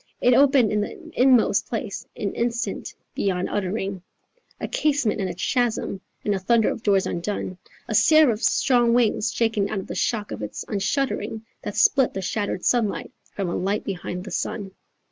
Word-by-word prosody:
It 250 - +4
opened 270 -3 +5
in 210 -1 +1
the 325 - -7
inmost 250 -5 +4
place 220 -3 -4
an 200 - -2
instant 235 0 -2 0.2
beyond 185 -2 -1
uttering, 195 -1 -2 0.6
A - - -3
casement 275 -9 +1
and 190 - -1
a 175 - -5
chasm 230 -2 -1 0.2
and 205 - +2
a 195 - -1
thunder 225 +3 +3
of - - -4
doors 200 -3 +2
undone, 185 0 -3 0.3
A - - -3
seraph's 300 -8 +5
strong 240 -2 +3
wing 240 -3 +2
shaken 215 -2 0
out 195 -3 -3
the - - -6
shock 215 -3 -1
of - - -5
its 105 0 -5
unshuttering, 220 +2 -2 0.2
That - - -5
split 280 - +3
the 195 - -2
shattered 200 -1 -2
sunlight 230 -5 +1 0.2
from 195 -2 -2
a 170 - -2
light 200 +3 -1
behind 180 -2 -5
the 195 - -8
sun. 195 +2 -3
210 Hz, 170 wpm, -24 LUFS, 195-240 Hz, 0.6 s, opened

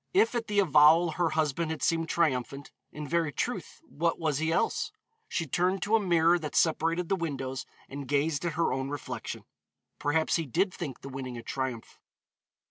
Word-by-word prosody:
If 430 +4 +4
at 235 -2 -2
the 205 - -2
avowal 160 -1 +6
her 170 +1 +1
husband 155 +1 0
had 160 -1 -4
seemed 165 -1 +1
triumphant, 140 -4 0 0.2
in 150 0 -6
very 165 -1 +1
truth - - -4
what 165 +3 -1
was 155 -4 0
he 160 +1 0
else? - - 0 0.4
She 165 - -1
turned 180 +6 0
to 215 +3 +3
a - - +5
mirror 175 -3 +3
that 150 -2 -6
separated 165 +2 +2
the 195 - +2
windows 135 -7 -4 0.2
and 140 0 -7
gazed 145 +2 +1
at 170 -3 -1
her 165 -3 +1
own 135 +1 -2
reflection. 145 -1 -5 0.6
Perhaps 160 +3 +1
he 165 -3 -3
did 185 - +1
think 145 -7 -6
the 135 - -8
winning 130 -2 -6
a 115 - -8
triumph. 130 -2 -4
160 Hz, 185 wpm, -29 LUFS, 140-170 Hz, 0.6 s, avowal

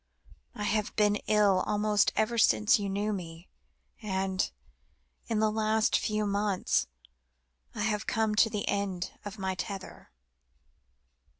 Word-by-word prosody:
I 210 - -5
have 210 0 -1
been 210 -1 +3
ill 205 -3 +4
almost 210 0 +2
ever 230 +2 +1
since 110 - +4
you 200 -1 -3
knew 205 +2 -1
me, 170 -2 -7 0.5
and 190 -2 -1 0.8
in 225 - -1
the 215 0 +2
last 220 0 +1
few 215 0 0
months 200 -1 0 0.9
I - - -3
have 215 0 -1
come 220 -2 +1
to 220 +1 +4
the 210 -1 -3
end 195 -3 -2
of 205 +1 -7
my 190 -1 -2
tether. 195 +1 -7
210 Hz, 130 wpm, -29 LUFS, 195-215 Hz, 0.9 s, ill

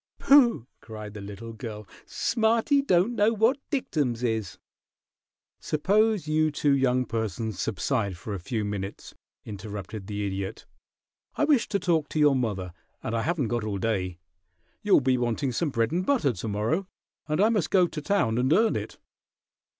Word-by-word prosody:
"Pooh!" 255 - +5
cried 105 -2 -9
the 105 - -8
little 105 +3 -8
girl. 110 -3 -7 0.2
"Smarty 235 +4 +2
don't 190 -3 +2
know 215 -1 +3
what 230 +6 +2
dictums 145 - -1
is!" 110 -5 -2 1.0
"Suppose 205 +3 +1
you 155 0 +2
two 145 -1 +2
young 130 -1 +2
persons 110 -2 -3
subside 100 -2 -1
for 105 +5 -6
a 100 - -4
few 110 +4 -3
minutes!" 100 -1 -5 0.3
interrupted 100 -1 -7
the 105 -1 -3
Idiot. 95 +1 -4 0.7
"I - - 0
wish 285 -5 +3
to 205 - 0
talk 165 -5 0
to 155 - -2
your 145 -2 +5
mother, 100 -8 -2 0.3
and 110 - -2
I 115 - 0
haven't 155 -5 -1
got 120 -2 -1
all 105 -2 -2
day. 95 -4 -1 0.6
You'll 205 -7 +4
be 130 -1 +2
wanting 120 +3 -1
some 150 +6 -1
bread 115 -2 0
and 175 +3 0
butter 185 - +2
to 105 +3 -6
morrow, 110 - -1 0.4
and 155 0 -1
I 210 +3 +5
must 210 -7 0
go 185 -2 +4
to 160 -3 -5
town 145 - +1
and 130 +3 +1
earn 225 +6 +4
it." - - -5
125 Hz, 165 wpm, -26 LUFS, -, 1.0 s, Pooh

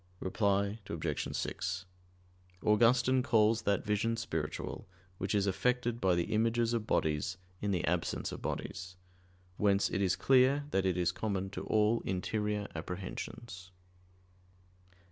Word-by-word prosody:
Reply 100 +2 0
Obj. - - -2
6: 90 +1 -3 0.8
Augustine 120 +4 +4
calls 110 -3 +3
that 100 -2 0
vision 110 +2 +1
spiritual 80 -10 -4 0.3
which 95 +2 -1
is 100 -1 +3
effected 120 +4 0
by 95 -2 +3
the 85 +6 -1
images 115 +1 +2
of 115 -2 -1
bodies 80 +4 0 0.2
in 105 - -1
the 90 -4 0
absence - - -1
of - - -7
bodies. 95 -2 -4 0.6
Whence 100 -1 +2
it 100 - 0
is 95 -2 +2
clear 135 +2 +4
that 95 0 +2
it 90 -1 +1
is 90 -1 +2
common 95 -3 -2
to - - -5
all 110 +2 +3
interior 105 +2 -1
apprehensions. 90 +3 -6
105 Hz, 130 wpm, -32 LUFS, 95-115 Hz, 0.8 s, Augustine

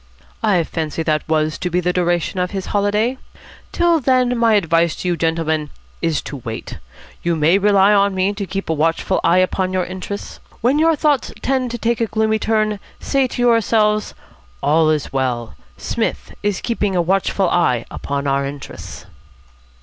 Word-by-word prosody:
"I 180 -5 +3
fancy 160 0 -3
that 155 -1 -1
was 155 -1 0
to 180 - -2
be 180 +1 +1
the 180 0 0
duration 175 0 0
of 180 0 0
his 195 -1 -4
holiday. 210 +5 +1 0.5
Till 345 -1 +3
then 255 -2 +2
my 230 -2 +3
advice 170 -3 +2
to - - -5
you 175 - +1
gentlemen 160 -2 -1 0.3
is 165 -3 0
to 145 - -6
wait. 115 -3 -7 0.4
You 170 -1 0
may 160 +5 +3
rely 200 0 +4
on 200 -1 +3
me 190 +2 +1
to 200 -1 -5
keep 195 +2 -4
a 160 - +1
watchful 160 +2 0
eye 170 +2 +4
upon 185 0 +1
your 185 -1 0
interests. 190 +2 -7 0.2
When 260 +6 +2
your 325 0 +4
thoughts 295 -3 +1
tend 260 -2 0
to 240 - -4
take 235 0 -1
a 230 - +2
gloomy 220 0 +1
turn, 215 -1 0 0.2
say 275 -2 +1
to 245 - -3
yourselves, 220 -2 +2 0.5
'All 155 +1 +3
is 155 -3 -1
well. 125 -4 -1 0.2
Psmith - - -3
is 205 -2 -1
keeping 210 -5 -1
a - - +2
watchful 190 0 +1
eye 125 -9 +2
upon 140 0 -3
our 140 0 +1
interests.'" 140 0 -8
185 Hz, 175 wpm, -19 LUFS, 160-220 Hz, 0.5 s, rely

